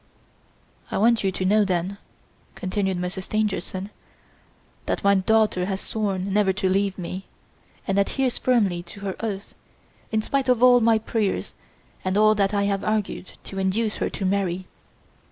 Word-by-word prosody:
"I -, -, -2 dB
want 230 Hz, +2 st, +3 dB
you 195 Hz, -, +2 dB
to 185 Hz, -, -3 dB
know 210 Hz, +3 st, +4 dB
then," 190 Hz, +1 st, -1 dB, 0.6 s
continued 190 Hz, 0 st, -1 dB
Monsieur 180 Hz, +2 st, -3 dB
Stangerson, 200 Hz, -1 st, -2 dB, 1.0 s
"that -, -, -1 dB
my 200 Hz, 0 st, +5 dB
daughter 200 Hz, -1 st, +2 dB
has 195 Hz, -1 st, -2 dB
sworn 195 Hz, -3 st, -2 dB
never 205 Hz, -2 st, +3 dB
to 190 Hz, 0 st, -1 dB
leave 195 Hz, +1 st, +1 dB
me, 185 Hz, +1 st, -6 dB, 0.6 s
and 195 Hz, +1 st, +2 dB
adheres 255 Hz, +5 st, 0 dB
firmly 205 Hz, -9 st, +2 dB
to 175 Hz, +3 st, -12 dB
her 195 Hz, -2 st, -3 dB
oath, 205 Hz, -3 st, -4 dB, 0.6 s
in 220 Hz, -1 st, +1 dB
spite 270 Hz, +1 st, 0 dB
of 250 Hz, -1 st, +3 dB
all 245 Hz, -1 st, +7 dB
my 225 Hz, 0 st, +5 dB
prayers 220 Hz, -2 st, -2 dB, 0.5 s
and 185 Hz, +1 st, 0 dB
all 215 Hz, 0 st, +6 dB
that 200 Hz, -2 st, +1 dB
I 200 Hz, -1 st, +1 dB
have 200 Hz, -1 st, 0 dB
argued 215 Hz, -3 st, -2 dB
to 195 Hz, -, -6 dB
induce 210 Hz, +3 st, 0 dB
her -, -, -1 dB
to 195 Hz, -, -4 dB
marry. 185 Hz, -1 st, 0 dB
200 Hz, 160 wpm, -24 LUFS, 190-215 Hz, 1.0 s, all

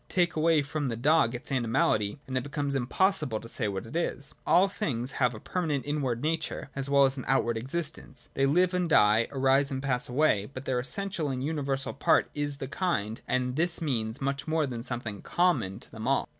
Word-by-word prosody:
Take 175 Hz, -2 st, +1 dB
away 160 Hz, -1 st, +3 dB
from 145 Hz, 0 st, -3 dB
the 115 Hz, -, -2 dB
dog 140 Hz, -1 st, +3 dB
its 120 Hz, -, -6 dB
animality, 115 Hz, -3 st, +1 dB
and 130 Hz, -, -5 dB
it 130 Hz, -, 0 dB
be 145 Hz, -, -8 dB
comes 140 Hz, -1 st, -2 dB
impossible 140 Hz, -, +1 dB
to 115 Hz, -, -10 dB
say 115 Hz, -1 st, -2 dB
what 100 Hz, +1 st, -4 dB
it 115 Hz, -, -10 dB
is. 165 Hz, -4 st, -2 dB
All 180 Hz, +3 st, +5 dB
things 135 Hz, -, -2 dB
have 125 Hz, -3 st, +1 dB
a -, -, -8 dB
permanent 155 Hz, -4 st, -2 dB
inward 140 Hz, -5 st, -1 dB
nature, 155 Hz, -3 st, -2 dB
as 135 Hz, 0 st, -3 dB
well 140 Hz, 0 st, +6 dB
as 135 Hz, +1 st, 0 dB
an 130 Hz, -, -5 dB
outward 120 Hz, -2 st, +2 dB
existence. 140 Hz, +1 st, -4 dB
They 135 Hz, 0 st, +2 dB
live 180 Hz, +5 st, +3 dB
and 180 Hz, -2 st, 0 dB
die, 110 Hz, -5 st, +5 dB
arise 135 Hz, +1 st, +3 dB
and 135 Hz, -2 st, -3 dB
pass 125 Hz, -3 st, +2 dB
away; 125 Hz, -7 st, +2 dB
but 130 Hz, +1 st, -6 dB
their 125 Hz, -1 st, 0 dB
essential 165 Hz, +4 st, -3 dB
and 130 Hz, -1 st, -3 dB
universal 140 Hz, -3 st, -1 dB
part 140 Hz, -, +2 dB
is 145 Hz, -1 st, -2 dB
the 135 Hz, -, -5 dB
kind; 120 Hz, -, -2 dB
and 125 Hz, 0 st, 0 dB
this 170 Hz, +1 st, +1 dB
means 120 Hz, -5 st, -2 dB
much 140 Hz, +2 st, -2 dB
more 155 Hz, -1 st, +1 dB
than 120 Hz, -4 st, -5 dB
something 120 Hz, -4 st, -5 dB
common 170 Hz, -, +1 dB
to -, -, -15 dB
them 110 Hz, +1 st, -6 dB
all. 135 Hz, -, +2 dB
135 Hz, 210 wpm, -28 LUFS, 120-155 Hz, -, well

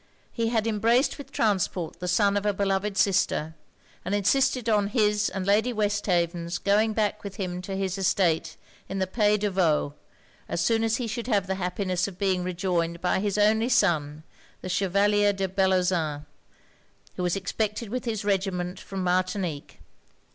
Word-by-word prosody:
He 230 Hz, -2 st, -1 dB
had 225 Hz, -2 st, 0 dB
embraced 230 Hz, +6 st, +2 dB
with 285 Hz, -, -10 dB
transport 185 Hz, -5 st, -1 dB
the 180 Hz, -, -4 dB
son 200 Hz, +3 st, +2 dB
of 205 Hz, -, 0 dB
a 205 Hz, -1 st, +1 dB
beloved 195 Hz, 0 st, -1 dB
sister, 180 Hz, -5 st, +1 dB, 0.5 s
and 185 Hz, +4 st, -1 dB
insisted 245 Hz, +3 st, +2 dB
on 210 Hz, -3 st, +2 dB
his 210 Hz, -1 st, +1 dB
and 190 Hz, -1 st, -4 dB
Lady 210 Hz, +5 st, +2 dB
Westhaven's 180 Hz, -6 st, 0 dB
going 215 Hz, +3 st, +2 dB
back 210 Hz, -1 st, -1 dB
with 200 Hz, -2 st, -7 dB
him 180 Hz, -3 st, -4 dB
to 190 Hz, +1 st, -5 dB
his 195 Hz, 0 st, -2 dB
estate 180 Hz, -3 st, +1 dB, 0.3 s
in 195 Hz, -, -4 dB
the 190 Hz, -, +1 dB
Païs 210 Hz, +2 st, +2 dB
de 205 Hz, -1 st, 0 dB
Vaud, 160 Hz, -6 st, +1 dB, 0.6 s
as -, -, -2 dB
soon 225 Hz, -1 st, +2 dB
as 225 Hz, 0 st, +1 dB
he 245 Hz, -, -3 dB
should 230 Hz, +1 st, -4 dB
have 205 Hz, -6 st, +1 dB
the 190 Hz, -, -2 dB
happiness 185 Hz, 0 st, -1 dB
of 190 Hz, -3 st, -9 dB
being 185 Hz, -2 st, 0 dB
rejoined 175 Hz, -2 st, -1 dB
by 180 Hz, +1 st, +1 dB
his 205 Hz, 0 st, -1 dB
only 220 Hz, +3 st, +3 dB
son, 160 Hz, -, +1 dB, 0.4 s
the 185 Hz, -, -6 dB
Chevalier 200 Hz, +2 st, +2 dB
de 195 Hz, -1 st, -2 dB
Bellozane, 180 Hz, -6 st, 0 dB, 0.9 s
who -, -, -4 dB
was 180 Hz, 0 st, 0 dB
expected 210 Hz, +3 st, -2 dB
with 250 Hz, +3 st, -4 dB
his 220 Hz, -4 st, -3 dB
regiment 190 Hz, -2 st, -1 dB
from 195 Hz, -1 st, -5 dB
Martinique. 180 Hz, -3 st, -2 dB
195 Hz, 170 wpm, -26 LUFS, 180-210 Hz, 0.9 s, only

